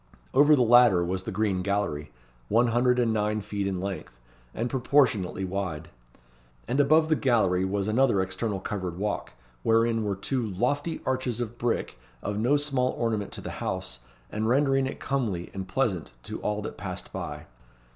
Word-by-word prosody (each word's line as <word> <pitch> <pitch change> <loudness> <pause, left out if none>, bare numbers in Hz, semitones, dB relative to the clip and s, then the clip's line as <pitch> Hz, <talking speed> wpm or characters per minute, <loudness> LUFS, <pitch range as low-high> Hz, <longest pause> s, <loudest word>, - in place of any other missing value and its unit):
Over 145 +3 +6
the 130 - +3
latter 120 -7 +6
was 95 +1 -2
the 110 - -3
Green 100 -2 0
Gallery, 95 -7 -1 0.4
one 120 +3 +4
hundred 125 +2 +3
and 120 -2 +2
nine 105 0 0
feet 100 -1 -3
in 95 -2 -2
length, 95 0 -5 0.3
and 115 - -2
proportionately 120 -8 +2
wide. 90 -4 -4 0.8
And 125 +5 0
above 155 +3 +5
the 160 - +3
gallery 100 -10 +2
was 100 +1 -1
another 110 -2 +3
external 95 +2 -2
covered 95 -4 -4
walk, 105 +1 -3 0.3
wherein 115 - +2
were 100 -2 -1
two 125 +6 -2
"lofty 125 - -1
arches 130 -3 -1
of 120 0 -4
brick, 120 - -1 0.2
of 105 0 -2
no 125 +6 +3
small 135 -3 0
ornament 110 -3 -1
to - - -6
the - - -6
house, 95 -8 -3 0.3
and 110 +1 -1
rendering 135 0 +3
it - - -6
comely 110 -11 -2
and 95 -1 -5
pleasant 95 - -1
to - - -6
all 105 0 -1
that - - -6
passed 95 -3 -6
by." - - -5
110 Hz, 170 wpm, -27 LUFS, 95-125 Hz, 0.8 s, Over